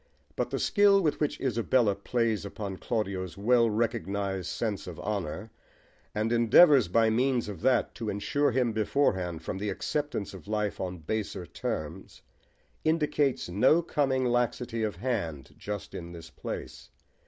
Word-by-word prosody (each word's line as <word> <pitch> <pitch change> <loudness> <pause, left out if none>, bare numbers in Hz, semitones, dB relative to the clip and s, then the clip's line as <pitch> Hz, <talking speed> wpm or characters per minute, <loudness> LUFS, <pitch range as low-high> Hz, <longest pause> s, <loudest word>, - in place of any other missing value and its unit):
But - - -1
the - - -2
skill 205 -1 +4
with 160 -6 0
which 150 - -1
Isabella 120 -3 +2
plays 110 +2 -1
upon 100 -1 -5
Claudio's 95 -7 -3
well 115 +3 +4
recognised 100 -4 -1
sense 105 -5 -3
of 85 -3 -7
honour, 100 0 -4 0.6
and 110 +2 0
endeavours 120 - +6
by 110 +5 +3
means 125 +1 +1
of 100 -5 -7
that 130 +1 +2
to 115 -2 -4
insure 140 +9 +1
him 125 -1 +1
beforehand 95 - 0
from 95 - -4
the 105 +1 -2
acceptance 145 +1 -3
of 95 0 -11
life 105 -1 -1
on 90 -1 -3
baser 95 +2 -3
terms, 80 +2 -5 0.6
indicates 150 -4 +1
no 130 - +4
coming 135 -5 +1
laxity 120 -1 0
of 110 -2 -1
hand 100 - -3
just 105 -1 -6
in 85 0 -7
this 80 -1 -10
place. - - -7
110 Hz, 145 wpm, -29 LUFS, 95-125 Hz, 0.6 s, endeavours